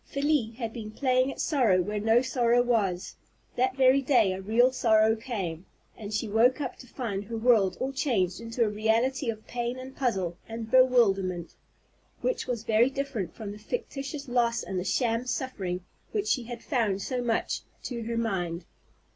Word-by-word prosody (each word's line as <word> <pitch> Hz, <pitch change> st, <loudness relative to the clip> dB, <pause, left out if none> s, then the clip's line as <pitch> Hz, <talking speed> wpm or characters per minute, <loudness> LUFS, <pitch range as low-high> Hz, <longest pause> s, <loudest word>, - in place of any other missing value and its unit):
Felie 280 Hz, -5 st, 0 dB
had 230 Hz, -3 st, -4 dB
been 220 Hz, -3 st, -6 dB
playing 255 Hz, +3 st, +1 dB
at -, -, -10 dB
sorrow 245 Hz, -, +3 dB
where 205 Hz, +4 st, -1 dB
no 225 Hz, +4 st, +3 dB
sorrow 245 Hz, -2 st, +2 dB
was. 205 Hz, -7 st, 0 dB, 0.4 s
That 255 Hz, +1 st, +1 dB
very 265 Hz, +1 st, +5 dB
day 245 Hz, -8 st, +3 dB
a 190 Hz, -, -5 dB
real 230 Hz, +6 st, +3 dB
sorrow 220 Hz, -3 st, +4 dB
came, 195 Hz, -8 st, -5 dB, 0.3 s
and 205 Hz, -1 st, -8 dB
she 215 Hz, +2 st, -1 dB
woke 230 Hz, +6 st, +3 dB
up 265 Hz, -4 st, -3 dB
to 250 Hz, -, -13 dB
find 210 Hz, -6 st, -4 dB
her 230 Hz, +2 st, -5 dB
world 220 Hz, -5 st, +3 dB
all 265 Hz, +1 st, -2 dB
changed 215 Hz, -9 st, 0 dB
into 230 Hz, +1 st, -1 dB
a -, -, +2 dB
reality 225 Hz, +5 st, +1 dB
of 220 Hz, -1 st, -5 dB
pain 240 Hz, +1 st, -3 dB
and 260 Hz, +1 st, -9 dB
puzzle 190 Hz, -10 st, -1 dB
and 225 Hz, 0 st, -6 dB
bewilderment, 195 Hz, -9 st, +3 dB, 0.7 s
which -, -, -1 dB
was 235 Hz, -3 st, -2 dB
very 225 Hz, +3 st, +4 dB
different 270 Hz, -, -4 dB
from 210 Hz, -2 st, -6 dB
the 210 Hz, -, -9 dB
fictitious 280 Hz, -, -5 dB
loss 240 Hz, -1 st, +1 dB
and 190 Hz, -, -3 dB
the -, -, -2 dB
sham 230 Hz, +4 st, 0 dB
suffering 190 Hz, -10 st, -3 dB, 0.3 s
which 420 Hz, -1 st, -1 dB
she 250 Hz, -3 st, +1 dB
had 240 Hz, 0 st, -7 dB
found 215 Hz, -8 st, 0 dB
so 255 Hz, -1 st, -2 dB
much 235 Hz, -2 st, -1 dB, 0.2 s
to 240 Hz, -2 st, -4 dB
her 230 Hz, +1 st, -3 dB
mind. 185 Hz, -7 st, -2 dB
230 Hz, 180 wpm, -28 LUFS, 210-255 Hz, 0.7 s, very